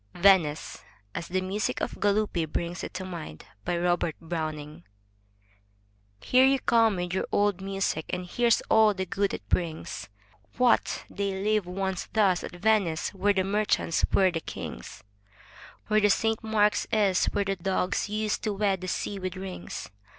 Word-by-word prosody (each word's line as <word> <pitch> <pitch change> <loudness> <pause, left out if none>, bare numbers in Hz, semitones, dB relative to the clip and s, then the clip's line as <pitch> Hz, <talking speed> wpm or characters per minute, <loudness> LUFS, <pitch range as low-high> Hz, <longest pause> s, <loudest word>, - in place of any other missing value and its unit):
VENICE 175 -5 +3 0.3
{As 170 - -5
the 185 +1 -1
music 195 +3 -2
of - - -4
Galuppi 205 -5 +1
brings 175 +1 -3
it - - -5
to 185 0 -4
mind) 165 - -8 0.2
Robert 175 -2 +1
Browning 155 -1 -5 1.4
Here 255 - +4
you 270 +1 +5
come 230 -4 +3
with 180 0 -3
your 190 - -1
old 205 -2 +2
music, 195 -5 -2
and 180 0 -3
here's 235 +5 +2
all 220 -2 +4
the 190 0 -2
good 195 +2 0
it - - -7
brings. 160 - -2 0.5
What! 250 -2 +2
they 200 -1 -2
lived 210 -3 +1
once 190 0 -3
thus 200 -5 +3
at - - -7
Venice 195 -4 +1
where 200 +1 +2
the 190 -1 +1
merchants 200 -4 0
were 190 -2 +4
the 165 - -2
kings, 60 - -8 0.8
Where 215 -1 +4
Saint 225 +2 +1
Mark's 210 -1 +2
is, 200 -4 +3
where 200 - 0
the 195 0 0
Doges 185 +2 -1
used 215 0 -1
to 215 - 0
wed 195 -2 0
the 185 - -5
sea 195 +2 -3
with 185 -1 -4
rings? 185 - -7
190 Hz, 160 wpm, -27 LUFS, 175-210 Hz, 1.4 s, you